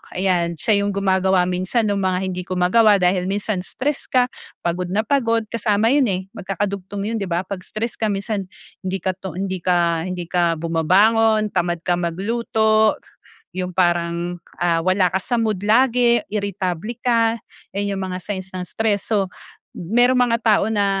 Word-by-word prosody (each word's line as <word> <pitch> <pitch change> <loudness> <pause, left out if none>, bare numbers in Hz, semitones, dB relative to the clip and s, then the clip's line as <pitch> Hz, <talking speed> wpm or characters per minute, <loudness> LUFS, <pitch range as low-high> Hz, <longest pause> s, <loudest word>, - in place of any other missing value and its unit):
ayan, 175 -2 +1
siya 205 +5 +2
'yung 200 -1 -1
gumagawa 190 -1 +2
minsan 185 +6 0
nung 205 -2 0
mga 185 0 0
hindi 180 0 -6
ko 185 - -3
magawa 205 +4 +5
dahil 180 -1 +1
minsan 200 0 -1
stress 275 +10 -3
ka, 250 -1 +2 0.3
pagod 175 +1 -1
na 205 +4 0
pagod 230 -3 +1
kasama 220 0 +1
yun 275 -2 +3
eh, 190 -2 -1
magkakadugtong 200 -1 -4
yun 225 +2 -2
di 195 - -3
ba? 175 +1 -1
'Pag 190 0 -6
stress 220 +5 -5
ka 220 - +1
minsan 200 -1 -2 0.3
hindi 190 +1 -4
ka 190 - +1
to 190 -4 -7
hindi 190 0 -3
ka 170 -1 +1
hindi 180 -1 -4
ka 170 -2 +2
bumabangon 210 +7 +3
tamad 175 -2 -1
ka 175 0 0
magluto. 220 +4 +1 0.6
'Yung 180 -1 -4
parang 175 -1 0 0.4
wala 185 +1 +2
ka 190 - 0
sa 240 +6 -2
mood 220 -4 0
lagi, 235 +1 +3
iritable 200 0 -3
ka. 230 -2 +3 0.4
Iyan 200 0 -1
'yung 195 - -4
mga 180 0 -4
signs 190 -2 -4
ng 180 - -3
stress. 220 -1 -1
So, 200 -3 +2 0.5
m 170 - -8
mayroong 245 +1 +4
mga 230 - +2
tao 210 -3 +4
na 205 -2 +1
195 Hz, 170 wpm, -21 LUFS, 180-220 Hz, 0.6 s, magawa